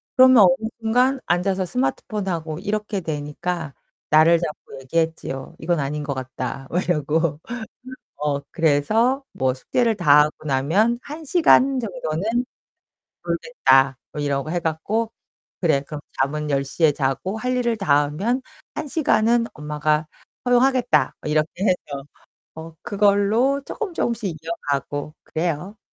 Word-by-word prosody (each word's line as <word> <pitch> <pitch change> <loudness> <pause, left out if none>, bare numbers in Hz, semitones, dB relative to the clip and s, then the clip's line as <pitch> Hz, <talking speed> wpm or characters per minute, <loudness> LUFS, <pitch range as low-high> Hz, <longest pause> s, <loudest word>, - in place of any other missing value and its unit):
그러면 260 -1 +7
어느 185 +4 +3
순간 250 +4 +2
앉아서 185 +2 +1
스마트폰하고 165 +3 -2
이렇게 210 +1 -2
되니까 160 0 -4 0.3
날을 160 +2 +6
잡고 150 -4 -6
얘기했지요. 160 -2 -2
"이건 170 -1 0
아닌 145 +2 -2
것 140 -1 -3
같다." 130 +1 -5
막 180 +2 +1
이러고. 155 -1 0 0.8
어 145 -1 -1
그래서 215 - +2
뭐 130 -1 0
"숙제를 230 - 0
다하고 150 -4 +4
나면 160 - +2
1 305 +3 -8
시간 275 -4 +4
정도는 225 0 -2 0.8
놀겠다." 135 - +2
뭐 150 - -5
이러고 145 +1 -1
해 175 - 0
갖고. 200 +8 -1 0.5
"그래, 155 -6 +3
그럼 145 +1 -7 0.2
잠은 150 +2 -1
10 140 -1 +1
시에 150 +3 +2
자고 140 +9 -2
할 250 +3 -1
일을 235 -2 0
다 145 -8 +3
하면 205 - -1 0.3
1 305 - -4
시간은 235 -6 +2
엄마가 150 +1 0 0.4
허용하겠다." 245 0 +3
뭐 - - -3
이렇게 155 +4 0
해서. 150 -8 -1 0.5
어 160 0 -9
그걸로 210 +7 +2
조금 420 -6 -5
조금씩 225 - -1
이어가고 145 -2 -3
그래요. 175 +5 -3
170 Hz, 275 characters per minute, -22 LUFS, 150-220 Hz, 0.8 s, 그러면